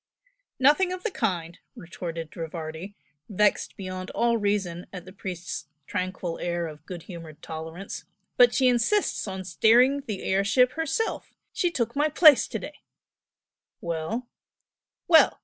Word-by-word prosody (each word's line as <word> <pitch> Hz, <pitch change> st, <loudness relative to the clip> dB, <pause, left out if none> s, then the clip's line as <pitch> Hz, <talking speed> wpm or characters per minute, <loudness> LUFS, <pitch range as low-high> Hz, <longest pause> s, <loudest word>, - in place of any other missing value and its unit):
"Nothing 300 Hz, +8 st, +4 dB
of 365 Hz, 0 st, -5 dB
the 450 Hz, -, -1 dB
kind" 180 Hz, -, -2 dB, 0.2 s
retorted 165 Hz, -1 st, -7 dB
Rivardi; 165 Hz, +3 st, -6 dB, 0.3 s
vexed 210 Hz, +1 st, +1 dB
beyond 185 Hz, -1 st, -6 dB
all 235 Hz, 0 st, +3 dB
reason 200 Hz, -5 st, -1 dB
at 180 Hz, -2 st, -8 dB
the 185 Hz, -, -12 dB
priest's 185 Hz, -3 st, -6 dB, 0.2 s
tranquil 185 Hz, -2 st, -3 dB
air 175 Hz, -1 st, -2 dB
of 150 Hz, -2 st, -9 dB
good 175 Hz, -3 st, -7 dB
humored 165 Hz, -4 st, -10 dB
tolerance 160 Hz, +4 st, -7 dB, 0.3 s
"But 245 Hz, -1 st, +7 dB
she 260 Hz, 0 st, +3 dB
insists 250 Hz, -, +1 dB
on 190 Hz, -1 st, -5 dB
steering 240 Hz, +9 st, +4 dB
the 205 Hz, -3 st, -4 dB
air 195 Hz, +1 st, +1 dB
ship 250 Hz, +5 st, +4 dB
herself! 325 Hz, +9 st, -2 dB, 0.2 s
She 355 Hz, -, +1 dB
took 235 Hz, -7 st, -2 dB
my 295 Hz, +2 st, +2 dB
place 305 Hz, -2 st, +7 dB
to -, -, -3 dB
day." -, -, -9 dB, 1.0 s
"Well?" 170 Hz, +9 st, -3 dB, 0.8 s
"Well! 325 Hz, -2 st, +6 dB
195 Hz, 140 wpm, -26 LUFS, 170-250 Hz, 1.0 s, But